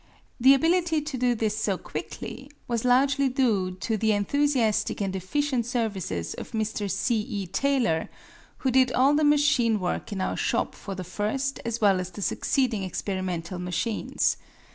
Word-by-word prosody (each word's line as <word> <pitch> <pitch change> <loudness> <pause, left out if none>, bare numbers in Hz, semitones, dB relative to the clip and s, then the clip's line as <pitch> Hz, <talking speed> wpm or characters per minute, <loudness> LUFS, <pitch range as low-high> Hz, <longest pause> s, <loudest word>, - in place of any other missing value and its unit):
The 265 +3 +7
ability 330 +1 +2
to 300 -2 -5
do 250 -1 +1
this 215 -2 -1
so 210 -3 0
quickly 270 +8 -7 0.2
was 235 -2 -1
largely 270 +2 +3
due 230 -8 +1
to 220 +1 0
the 220 +1 +2
enthusiastic 235 +1 +1
and 195 -2 -2
efficient 245 +6 -1
services 195 - -2
of - - -9
Mr. 215 -2 -2
C. 235 +3 +1
E. 210 -4 -4
Taylor, 215 -4 0 0.6
who 260 - +3
did 255 0 +4
all 270 +3 +4
the 305 +1 +2
machine 280 -7 +3
work 180 +2 -3
in 200 - -3
our 185 - -1
shop - - 0
for 195 - -7
the 185 - -5
first 220 +9 -2
as 230 0 -2
well 195 -3 +4
as 180 0 -4
the 190 +3 -6
succeeding 250 -4 0
experimental 185 -2 -3
machines. 180 +5 -1
225 Hz, 165 wpm, -26 LUFS, 195-270 Hz, 0.6 s, The